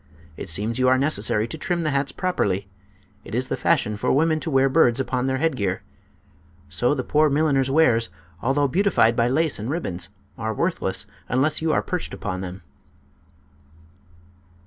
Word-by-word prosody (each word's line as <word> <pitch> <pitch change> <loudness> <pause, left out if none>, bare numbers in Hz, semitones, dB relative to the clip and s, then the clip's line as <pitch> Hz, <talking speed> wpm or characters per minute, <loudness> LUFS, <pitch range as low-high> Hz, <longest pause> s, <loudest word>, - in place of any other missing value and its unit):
It 95 - -7
seems 105 +8 -1
you 130 - +3
are 130 0 +5
necessary 110 -6 +1
to - - -6
trim 175 -1 -1
the 155 - 0
hats 140 0 0
properly. 100 - -1 0.6
It 105 - -7
is 130 +1 -1
the - - 0
fashion 105 0 +1
for - - 0
women 155 +3 +2
to 160 - -3
wear 135 -2 +3
birds 130 -4 +3
upon 130 -1 -1
their 130 0 0
headgear. 125 -12 -1 0.9
So 120 - +1
the 130 - -2
poor 150 +3 +3
milliner's 140 -2 +2
wares, 125 - +3 0.3
although 140 +3 +2
beautified 175 - +3
by 115 0 +2
lace 150 +2 +1
and 110 +4 -4
ribbons, 95 - -2 0.3
are 110 -1 -2
worthless 95 - 0 0.2
unless 140 +6 +1
you 160 0 +1
are - - +1
perched 180 -2 -3
upon 95 -3 -4
them." 95 +1 -7
130 Hz, 170 wpm, -23 LUFS, 110-155 Hz, 0.9 s, are